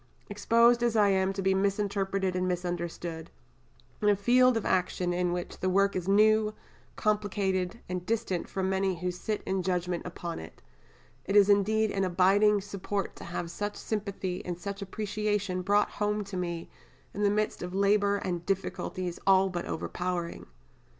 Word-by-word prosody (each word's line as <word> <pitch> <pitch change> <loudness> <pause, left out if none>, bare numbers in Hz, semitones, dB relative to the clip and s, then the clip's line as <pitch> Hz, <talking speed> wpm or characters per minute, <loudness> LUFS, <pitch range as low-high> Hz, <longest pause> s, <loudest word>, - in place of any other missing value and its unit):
Exposed 235 +3 +4
as 235 -1 +1
I 210 -2 +5
am 190 0 +2
to 195 0 -4
be 190 0 +3
misinterpreted 195 -1 0
and 185 0 0
misunderstood, 175 -2 -4 0.7
in 210 - +3
a 205 - +5
field 245 +4 +4
of 225 - -3
action 180 -1 0
in 180 0 0
which 175 0 -4
the 185 - 0
work 200 +2 +2
is 180 -1 -3
new, 215 +1 +4 0.4
complicated, 205 -2 0
and 180 -1 -3
distant 205 -4 -2
from 190 -1 -2
many 190 -2 0
who 180 +1 -1
sit 205 +4 -4
in 190 0 0
judgment 180 -1 -1
upon 175 -1 -6
it, 80 - -11 0.7
it 195 - -1
is 205 -1 +7
indeed 215 +2 +3
an 195 -1 0
abiding 195 +3 +4
support 200 0 -4
to - - -9
have 170 0 -4
such 205 +4 -4
sympathy 195 -4 -4
and 175 -1 -4
such 200 +2 -6
appreciation 205 -1 -2
brought 205 +3 +2
home 210 0 -1
to 195 -1 -8
me 170 -2 -3 0.5
in 205 - -4
the 205 - +4
midst 210 +1 -1
of 180 +1 -5
labour 200 +1 +3
and 175 -3 -3
difficulties 185 -2 -3
all 190 0 +5
but 175 -2 -4
overpowering. 175 0 -3
195 Hz, 165 wpm, -29 LUFS, 180-205 Hz, 0.7 s, is